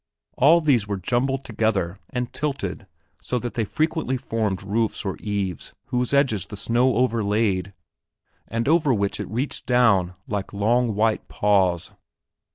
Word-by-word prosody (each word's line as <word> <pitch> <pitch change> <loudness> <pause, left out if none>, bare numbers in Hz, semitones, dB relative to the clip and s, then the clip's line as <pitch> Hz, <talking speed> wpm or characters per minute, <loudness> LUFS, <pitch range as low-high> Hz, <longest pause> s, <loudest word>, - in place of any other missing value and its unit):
All 160 +6 +5
these 130 -9 +2
were 100 -1 -2
jumbled 130 +7 -1
together 100 -5 -1
and 125 -1 -3
tilted 140 -8 -3 0.3
so 125 - -2
that 120 0 -4
they 115 - -1
frequently 155 - -1
formed 110 -6 -2
roofs 110 +3 -1
or 95 - -2
eaves 100 -5 -3 0.2
whose 125 -1 0
edges 135 - +2
the 105 - -8
snow 120 +5 +2
overlaid 105 -5 +1 0.8
and 115 +2 -2
over 155 -4 +3
which 100 -1 -1
it - - -5
reached 125 +7 -3
down 100 -8 +3
like 100 -1 -4
long 115 +2 +1
white 110 +1 +1
paws. 95 -4 +1
115 Hz, 145 wpm, -23 LUFS, 100-125 Hz, 0.8 s, All